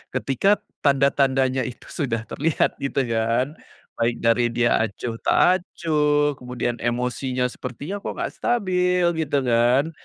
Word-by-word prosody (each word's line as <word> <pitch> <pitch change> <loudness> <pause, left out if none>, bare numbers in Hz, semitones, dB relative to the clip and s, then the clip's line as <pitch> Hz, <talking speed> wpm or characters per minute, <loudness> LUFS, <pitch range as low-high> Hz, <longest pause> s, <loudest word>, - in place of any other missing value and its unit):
ketika 195 +10 +1 0.2
tanda-tandanya 135 -2 +2
itu 125 - -9
sudah 120 -8 -2
terlihat 155 +2 0
gitu 140 0 -1
kan 115 +6 0 0.4
baik 115 +1 +1
dari 115 +1 +3
dia 120 0 +2
acuh 115 +2 -3
tak 185 0 +3
acuh 150 -3 +1
kemudian 125 -1 -3
emosinya 125 +1 -1
sepertinya 140 +10 -6
kok - - -5
nggak - - -3
stabil 180 -6 +1
gitu 145 -3 0
kan, 125 +5 +3
135 Hz, 125 wpm, -23 LUFS, 120-150 Hz, 0.4 s, dari